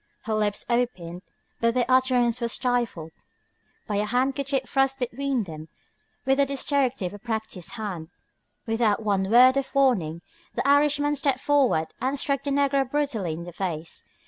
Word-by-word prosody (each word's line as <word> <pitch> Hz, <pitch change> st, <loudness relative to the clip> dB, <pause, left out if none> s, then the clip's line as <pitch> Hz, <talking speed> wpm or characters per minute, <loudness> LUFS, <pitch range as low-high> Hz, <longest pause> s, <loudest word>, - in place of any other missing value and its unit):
Her 220 Hz, -, -3 dB
lips 210 Hz, -1 st, 0 dB
opened, 210 Hz, -8 st, -2 dB, 0.4 s
but 230 Hz, +1 st, +1 dB
their 250 Hz, -1 st, +2 dB
utterance 255 Hz, -2 st, +3 dB
was 235 Hz, 0 st, 0 dB
stifled 240 Hz, -11 st, -1 dB, 0.7 s
by 205 Hz, -, -2 dB
a 210 Hz, -, +1 dB
handkerchief 265 Hz, +3 st, 0 dB
thrust 270 Hz, 0 st, +1 dB
between 260 Hz, 0 st, -1 dB
them 155 Hz, -3 st, -9 dB, 0.6 s
with 270 Hz, 0 st, +3 dB
the 280 Hz, -, +4 dB
dexterity 270 Hz, -4 st, 0 dB
of 180 Hz, -, -4 dB
a 205 Hz, -, -9 dB
practised 220 Hz, -5 st, -4 dB
hand. 195 Hz, -8 st, -5 dB, 0.6 s
Without 225 Hz, -2 st, +1 dB
one 195 Hz, -2 st, 0 dB
word 255 Hz, +4 st, +6 dB
of 275 Hz, +1 st, -3 dB
warning 185 Hz, -, +2 dB, 0.3 s
the -, -, -1 dB
Irishman 290 Hz, +1 st, +3 dB
stepped 275 Hz, -2 st, +1 dB
forward 265 Hz, -, +2 dB
and 265 Hz, +2 st, 0 dB
struck 275 Hz, 0 st, 0 dB
the 285 Hz, -, -4 dB
negro 275 Hz, -1 st, +1 dB
brutally 260 Hz, -, -1 dB
in 165 Hz, +2 st, -6 dB
the 175 Hz, 0 st, -9 dB
face. 170 Hz, -3 st, -4 dB
245 Hz, 160 wpm, -25 LUFS, 205-275 Hz, 0.7 s, word